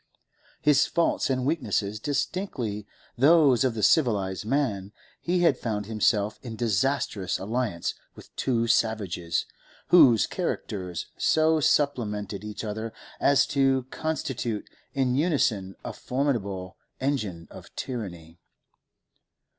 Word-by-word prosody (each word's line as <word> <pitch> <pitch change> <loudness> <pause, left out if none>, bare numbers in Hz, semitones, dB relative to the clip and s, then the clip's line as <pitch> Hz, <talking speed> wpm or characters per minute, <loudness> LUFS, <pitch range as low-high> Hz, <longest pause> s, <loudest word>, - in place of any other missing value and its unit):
His 150 -1 +4
faults 170 -4 +1
and 130 -1 0
weaknesses 110 - -1
distinctly 125 - -3 0.3
those 140 -3 +5
of 130 -3 +1
the 110 - -3
civilised 100 -5 +2
man, 110 -7 -1 0.3
he 175 -1 +3
found 110 -5 -3
himself 105 -1 +1
in 115 -3 -7
disastrous 110 -3 0
alliance 105 -3 -2 0.2
with - - -15
two 115 -3 0
savages, 100 -7 0 0.4
whose 135 -11 +7
characters 90 -4 -4
so 160 0 +3
supplemented 105 -9 0
each 105 +1 -6
other 110 +1 -4 0.3
as 140 -1 +4
to 135 -2 +3
constitute 130 -8 -3 0.3
in 130 -2 +1
unison 125 - +1
a - - -4
formidable 100 -9 -2 0.2
engine 110 -12 -2
of - - -11
tyranny. 85 -9 -6
115 Hz, 105 wpm, -26 LUFS, 100-140 Hz, 0.4 s, whose